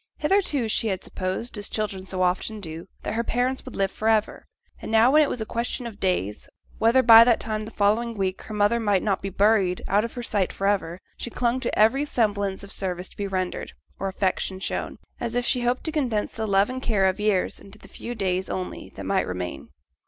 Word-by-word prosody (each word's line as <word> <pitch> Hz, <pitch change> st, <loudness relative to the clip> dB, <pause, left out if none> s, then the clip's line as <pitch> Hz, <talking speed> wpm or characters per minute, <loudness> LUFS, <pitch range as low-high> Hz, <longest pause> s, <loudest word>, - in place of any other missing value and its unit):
Hitherto 300 Hz, -, +1 dB
she 220 Hz, +1 st, +1 dB
had 190 Hz, -3 st, -2 dB
supposed, 190 Hz, +5 st, -4 dB
as 205 Hz, -, -4 dB
children 195 Hz, -3 st, -3 dB
so 185 Hz, 0 st, -1 dB
often 185 Hz, +4 st, 0 dB
do, 165 Hz, -2 st, -8 dB, 0.2 s
that -, -, -3 dB
her 230 Hz, +1 st, 0 dB
parents 250 Hz, +3 st, -1 dB
would 255 Hz, -, -9 dB
live 195 Hz, -1 st, 0 dB
for 220 Hz, -, -1 dB
ever; 220 Hz, -1 st, +1 dB, 0.3 s
and -, -, -6 dB
now 225 Hz, +3 st, +5 dB
when 305 Hz, +2 st, +6 dB
it 295 Hz, -, +3 dB
was 240 Hz, -, -3 dB
a -, -, -2 dB
question 235 Hz, +2 st, -3 dB
of 220 Hz, -3 st, -8 dB
days, 105 Hz, -, -1 dB, 0.3 s
whether 235 Hz, +4 st, +4 dB
by 230 Hz, -1 st, +10 dB
that 235 Hz, -1 st, +3 dB
time 215 Hz, -1 st, -3 dB
the -, -, -7 dB
following 225 Hz, +2 st, +1 dB
week 190 Hz, -1 st, -1 dB
her 215 Hz, -, -9 dB
mother 210 Hz, +3 st, +3 dB
might 205 Hz, -4 st, +1 dB
not 200 Hz, -3 st, 0 dB
be 195 Hz, -, -3 dB
buried 195 Hz, -2 st, +2 dB
out 205 Hz, +2 st, +3 dB
of 230 Hz, -, -5 dB
her 245 Hz, -, -5 dB
sight 200 Hz, -5 st, 0 dB
for 195 Hz, -, -4 dB
ever, 190 Hz, -4 st, 0 dB, 0.2 s
she -, -, -5 dB
clung 240 Hz, +2 st, 0 dB
to 250 Hz, -, -2 dB
every 235 Hz, +7 st, +4 dB
semblance 205 Hz, -8 st, 0 dB
of 200 Hz, -, -10 dB
service 185 Hz, -2 st, -3 dB
to -, -, -18 dB
be 200 Hz, -, -2 dB
rendered, 185 Hz, -2 st, -3 dB, 0.3 s
or 195 Hz, -, -2 dB
affection 190 Hz, 0 st, -1 dB
shown, -, -, -3 dB, 0.2 s
as 235 Hz, 0 st, -3 dB
if 245 Hz, 0 st, 0 dB
she 250 Hz, -, +2 dB
hoped 245 Hz, +1 st, 0 dB
to 320 Hz, -, -2 dB
condense 250 Hz, -9 st, -1 dB
the 220 Hz, -1 st, -4 dB
love 195 Hz, 0 st, +4 dB
and 260 Hz, 0 st, -5 dB
care 210 Hz, -6 st, +2 dB
of 190 Hz, +1 st, +1 dB
years 210 Hz, -3 st, +1 dB
into 195 Hz, -, -13 dB
the -, -, -15 dB
few 240 Hz, -, -7 dB
days 190 Hz, -3 st, -1 dB
only 185 Hz, -1 st, -5 dB
that -, -, -7 dB
might -, -, +1 dB
remain. 90 Hz, -6 st, -5 dB
210 Hz, 230 wpm, -25 LUFS, 190-235 Hz, 0.3 s, by